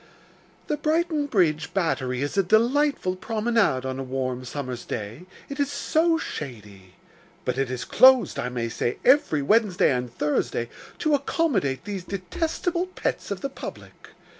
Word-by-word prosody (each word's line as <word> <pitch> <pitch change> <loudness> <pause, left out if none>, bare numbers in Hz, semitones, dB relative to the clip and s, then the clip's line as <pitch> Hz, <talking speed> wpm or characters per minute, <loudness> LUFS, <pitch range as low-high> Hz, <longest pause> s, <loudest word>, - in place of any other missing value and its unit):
The 300 - -1
Brighton 310 0 0
Bridge 170 - +1
Battery 130 -8 0
is 145 - -3
a 195 - +4
delightful 230 +1 +2
promenade 220 - +1
on 130 0 -3
a - - -3
warm 130 -1 -3
summer's 125 -1 -5
day, 110 - -6 0.2
it 280 +1 -7
is 285 0 +1
so 320 +4 +2
shady; 105 - -8 0.5
but - - -1
it 135 -2 0
is 130 -1 -4
closed, 260 -1 +5
I 125 - -2
may 120 -2 -2
say, 120 +1 -2
every 255 - +4
Wednesday 210 0 +3
and 125 -2 -2
Thursday, 130 -5 -1 0.3
to 310 - +1
accommodate 265 - 0
these 200 -3 -4
detestable 325 - -2
pets 370 - -3
of 200 -2 -4
the 275 - -2
public. - - -10
185 Hz, 150 wpm, -25 LUFS, -, 0.5 s, closed